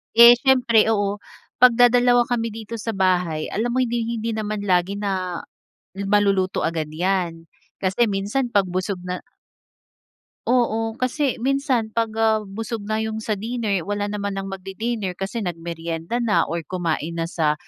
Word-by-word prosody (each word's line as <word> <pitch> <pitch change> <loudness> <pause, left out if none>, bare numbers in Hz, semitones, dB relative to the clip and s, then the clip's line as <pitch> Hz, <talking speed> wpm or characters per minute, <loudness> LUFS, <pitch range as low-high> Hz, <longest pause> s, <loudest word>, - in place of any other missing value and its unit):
Eh, 235 +1 +10
siyempre, 240 -5 +4
oo, 205 -1 -1 0.3
pag 250 0 +7
dadalawa 245 0 +4
kami 230 -2 -1
dito 225 +1 -7
sa 225 0 -3
bahay, 180 -5 +1
alam 235 +3 -2
mo 255 - 0
hinding-hindi 230 -2 -1
naman 215 -1 -3
lagi 185 +2 +1
na 185 -3 -2 0.6
yung 200 - -3
maluluto 195 -2 +2
agad 160 -1 -1
'yan. 175 -1 -1 0.4
Kasi 195 +5 +2
minsan 205 +6 -1
'pag 205 -4 +2
busog 185 0 -2
na 180 0 -4 1.3
Oo, 225 -2 +1
kasi 260 +1 0
minsan 260 -3 0
'pag, 230 -1 +1
ah, 220 -1 +3
busog 215 +2 -5
na 215 - +1
'yong 220 0 -3
sa 215 -2 -2
dinner, 215 -5 -2
wala 205 0 -2
naman 200 -1 -3
ng 195 0 -4
magdi-dinner 195 +1 -4
kasi 195 +5 -5
nagmeryenda 170 0 -4
na 215 -9 +1
or 165 -2 -3
kumain 170 -2 -2
na 165 0 -3
sa 155 -4 +1
205 Hz, 155 wpm, -22 LUFS, 185-230 Hz, 1.3 s, Eh